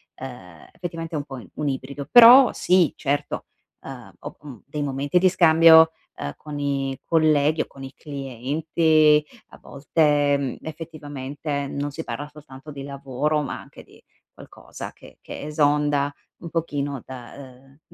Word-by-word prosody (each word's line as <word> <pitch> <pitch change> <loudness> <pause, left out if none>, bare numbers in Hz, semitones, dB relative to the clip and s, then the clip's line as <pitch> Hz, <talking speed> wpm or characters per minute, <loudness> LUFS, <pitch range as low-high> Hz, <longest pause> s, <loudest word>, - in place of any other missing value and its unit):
ehm, 95 -11 -11
effettivamente 165 -2 -6
è - - 0
un 145 - -4
po' 135 -6 -9
un 150 - -3
ibrido. 140 +1 -5
Però 245 +2 +9
sì 180 -4 +2
certo, 145 +1 -3 0.3
ehm, - - -10
ho, - - -9
mhmm, 140 -7 -11
dei 145 +2 -5
momenti 140 +4 0
di 185 - +4
scambio, 165 -2 +6 0.2
ehm, 70 - -5
con 150 -1 -8
i 135 -2 -2
colleghi 155 -1 +2
o - - -4
con 135 - -13
il 135 0 -9
clienti; 150 +3 +1 0.2
a - - -15
volte, 145 -1 +1
mhmm, 135 -3 -3
effettivamente 145 -2 -6
non 145 +1 -4
si 160 +3 -7
parla 140 +5 -6
soltanto 150 -1 -13
di 140 -1 -8
lavoro, 140 +2 -2
ma 140 - -5
anche - - -14
di - - -21 0.3
qualcosa - - -11
che - - -17
che - - -9
esonda 145 -1 +1 0.2
un 170 - -9
pochino 145 -5 -3
da, 125 -2 -10
ehm, 135 +1 -15
145 Hz, 155 wpm, -23 LUFS, 135-155 Hz, 0.3 s, Però